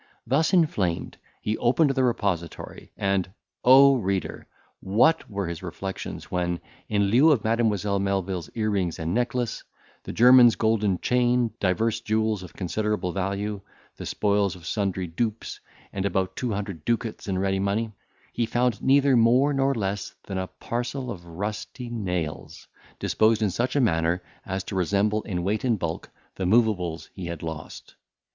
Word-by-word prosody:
Thus 145 +6 +2
inflamed, 105 - +1 0.3
he 105 +1 -1
opened 135 +5 +3
the 135 -1 +1
repository, 100 -9 -2
and, 95 -2 0 0.3
O 135 +2 +7
reader! 95 -5 -3 0.3
what 115 +12 +2
were 100 -2 -3
his 85 -1 -5
reflections, 95 +2 -6
when, 90 -1 -1 0.3
in 100 -1 +2
lieu 130 +9 +6
of 130 -8 +2
Mademoiselle 105 -3 +1
Melvil's 95 -4 -2
ear 110 -2 0
rings 90 -5 -1
and 80 +2 -2
necklace, 120 0 -1 0.4
the - - -7
German's 125 0 +7
golden 105 -4 +1
chain, 125 -1 +2
divers 110 +5 0
jewels 110 -2 0
of 90 - -11
considerable 105 0 -1
value, 100 +2 -2 0.4
the - - -6
spoils 100 -2 +1
of 85 -3 -13
sundry 95 -3 -1
dupes, 110 +6 -3 0.3
and 95 - -2
about 95 -1 -1
two 125 -2 -2
hundred 100 -6 -4
ducats 115 -2 -2
in 95 -2 -1
ready 95 0 0
money, 105 +3 -1 0.4
he 120 -1 0
found 120 -3 0
neither 140 0 +4
more 125 +5 +4
nor 135 0 +1
less 100 -2 -3
than 95 -2 -4
a 95 - -3
parcel 125 +4 -4
of 85 -5 -9
rusty 105 +7 -5
nails, 90 -8 -4 0.3
disposed 110 0 +2
in 100 - +1
such 120 +8 -1
a - - +4
manner 85 -6 +1 0.2
as 95 0 -2
to - - -7
resemble 100 +4 +1
in 90 -5 -3
weight 105 +6 -1
and 120 -4 +2
bulk 85 -3 -4 0.2
the 95 - -3
moveables 95 -6 +1
he 95 -3 -6
had 85 -2 -6
lost. 80 -2 -7
105 Hz, 155 wpm, -25 LUFS, 95-120 Hz, 0.4 s, O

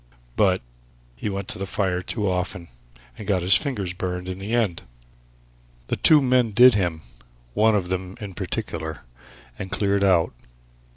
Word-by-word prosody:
But 95 -7 +2 0.5
he 85 - -4
went 100 -1 -4
to - - -5
the 95 - -3
fire 95 -2 -1
too 105 +3 -2
often, 90 -1 -2 0.5
and 105 - -8
got 95 -4 +1
his 95 +2 +6
fingers 105 -11 -1
burned 90 0 -4
in 95 0 -5
the 100 +3 -5
end. 110 -8 +1 1.1
The - - +1
two 150 -3 +5
men 125 -4 +2
did 125 +3 +8
him 85 -6 -1 0.5
one 110 - +4
of 90 -4 -1
them 95 0 -4
in 100 -3 -7
particular 85 -5 -4 0.6
and 95 - -5
cleared 100 0 +1
out. 90 -4 +3
95 Hz, 160 wpm, -24 LUFS, 90-105 Hz, 1.1 s, did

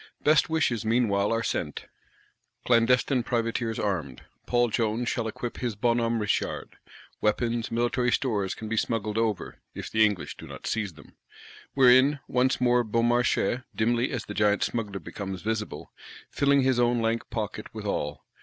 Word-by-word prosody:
Best 155 0 +4
wishes, 135 -8 +1
meanwhile, 110 -3 +2
are 115 0 0
sent; - - -3 0.8
clandestine 125 +2 +3
privateers 115 -1 -1
armed. 80 -11 -3 0.2
Paul 120 -1 +2
Jones 115 +1 0
shall 115 -1 -1
equip 120 +2 -5
his 120 -4 -3
Bon 120 +3 +2
Homme 115 0 0
Richard: 105 -2 -2 0.4
weapons, 115 +2 0
military 120 +1 +1
stores 105 -8 0
can 110 - -7
be 115 +1 -2
smuggled 110 -1 -1
over 110 -5 -2 0.2
(if - - -6
the 110 0 +4
English 105 -5 0
do - - -10
not - - -10
seize 105 -5 -2
them); 75 -2 -17 0.6
wherein, 130 +2 +6
once 130 +2 +1
more 125 -1 +3
Beaumarchais, 120 +2 +1
dimly 120 +3 +1
as 120 -4 -4
the 105 - -6
Giant 105 -1 +2
Smuggler 105 -4 -3
becomes 95 +2 -6
visible,—filling 120 +5 -2
his 130 -2 +2
own 120 0 +3
lank 115 0 -1
pocket 110 -3 -4
withal. 75 0 -4
115 Hz, 150 wpm, -27 LUFS, 105-120 Hz, 0.8 s, wherein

